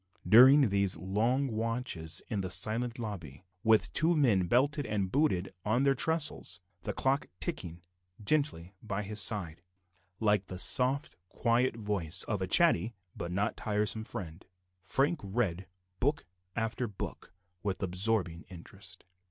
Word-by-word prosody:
During 130 +5 +7
these 100 -3 +2
long 110 +10 0
watches 115 -7 -3
in 105 -4 -2
the 95 - -4
silent 110 +7 +2
lobby, 90 - -7 0.2
with 110 -1 +5
the - - -4
two 165 +3 +2
men 110 - +3
belted 140 - +1
and 100 -3 -2
booted 95 - +1
on 115 +5 +1
their 140 0 +4
tressels, 160 - 0 0.2
the - - -3
clock 135 +2 0
ticking 85 0 -5 0.4
gently 105 - 0
by 105 -1 -4
his 105 +1 0
side, 90 -8 +1 0.6
like 105 -3 +1
the 95 - -7
soft 125 +10 +2
quiet 120 +1 +1
voice 100 -6 -2
of 105 -4 -3
a 95 - -1
chatty 120 - +3 0.2
but 85 - -5
not 100 +3 -1
tiresome 105 0 0
friend, 90 -5 -8 0.3
Frank 145 - 0
read 95 -3 -2 0.3
book 145 +4 0 0.3
after 115 +2 -2
book 100 -3 -7 0.3
with 100 +1 -3
absorbing 90 -2 0
interest. 90 -3 -12
105 Hz, 140 wpm, -31 LUFS, 95-125 Hz, 0.6 s, During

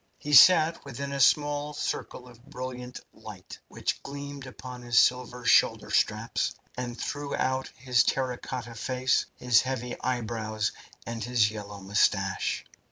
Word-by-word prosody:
He 150 - -5
sat 165 +3 +7
within 140 +1 -6
a 140 - -3
small 145 +1 +2
circle 125 -3 -4
of 120 -1 -16
brilliant 125 0 -7
light 110 -4 -11
which - - -3
gleamed 140 -1 -8
upon 125 0 -9
his 120 -1 -1
silver 125 -1 +2
shoulder - - +3
straps, - - 0 0.2
and 125 -1 -5
threw 145 -1 -3
out 130 0 -1
his 125 0 +3
terra 130 -2 -1
cotta 120 -3 -6
face, 125 +2 0
his 125 -2 +4
heavy 125 -2 -4
eyebrows, 110 -3 -2 0.3
and 115 -1 -5
his 115 -3 +2
yellow 105 -2 -8
moustache. 95 0 0
125 Hz, 140 wpm, -27 LUFS, 115-135 Hz, 0.3 s, sat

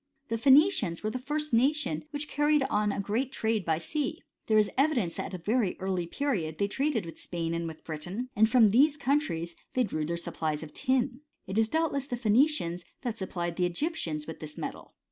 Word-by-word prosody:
The 230 - 0
Phoenicians 270 - +4
were 215 - 0
the 255 - -3
first 300 +2 -3
nation 290 +5 +2
which 290 0 -3
caried 295 0 +2
on 210 0 +2
a - - -3
great 225 +7 -1
trade 220 -4 0
by 160 -2 +1
sea. 300 - -3 0.2
There 220 - +4
is 210 -1 +3
evidence 255 - +1
that - - -3
at - - -11
a - - -22
very 220 -2 +1
early 185 -2 -1
period 170 - -2
they 200 - +1
traded 265 - 0
with 165 -1 -9
Spain 165 -1 -3
and 170 0 -2
with 160 -1 -9
Britain, 175 +10 -5
and 220 +1 +5
that - - -11
from 230 -5 +6
these 285 +6 +5
countries 255 - 0 0.2
they 255 - +4
drew 155 -8 -2
their 170 +1 -1
supplies 155 -2 -3
of 155 - -10
tin. 255 0 0 0.3
It 190 +2 -4
was 225 - +3
doubtless 285 -1 0
the 245 - -3
Phoe 235 -3 -2
nicians 215 - +3 0.2
that 235 -3 -3
supplied 175 -3 -3
the 180 -1 +2
Egyptians 170 - -2
with 160 - -8
this 150 -1 -8
metal. - - -6
220 Hz, 215 wpm, -29 LUFS, 170-280 Hz, 0.3 s, from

